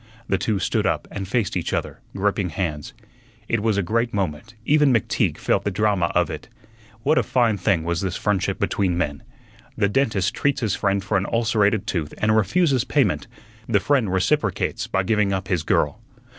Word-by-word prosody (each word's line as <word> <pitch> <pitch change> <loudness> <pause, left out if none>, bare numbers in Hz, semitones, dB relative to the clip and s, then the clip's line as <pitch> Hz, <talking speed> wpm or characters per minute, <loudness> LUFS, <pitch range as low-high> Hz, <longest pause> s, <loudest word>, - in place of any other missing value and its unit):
The 95 - +1
two 105 +3 0
stood 95 - 0
up - - -1
and 95 -2 -5
faced 110 0 -1
each 90 - -2
other, - - -3 0.2
gripping 100 -1 0
hands. 75 -3 -4 0.5
It 115 - +1
was 105 -1 +1
a 100 - +1
great 115 +4 0
moment; 100 +4 -3
even 150 0 +4
McTeague 115 -6 +1
felt - - 0
the - - 0
drama 100 -3 +1
of - - +3
it. - - -8 0.5
What 155 +3 +3
a - - +4
fine 120 -4 +2
thing 90 -3 +1
was 85 0 -1
this 95 -2 -2
friendship 105 -3 0
between 95 -4 0
men! 75 -5 -2 0.6
the 105 -3 +3
dentist 100 -4 +1
treats 140 -1 0
his 110 -5 0
friend 100 -1 0
for 100 +1 0
an 95 - -1
ulcerated 110 -3 +2
tooth 80 -4 -3
and 110 0 +2
refuses 130 - +2
payment; 130 -9 +1 0.4
the - - +4
friend 130 -9 +1
reciprocates 95 +3 0
by 95 - 0
giving 105 0 +1
up 95 -1 -3
his 90 -4 +1
girl. 80 +5 0
100 Hz, 185 wpm, -23 LUFS, 95-115 Hz, 0.6 s, even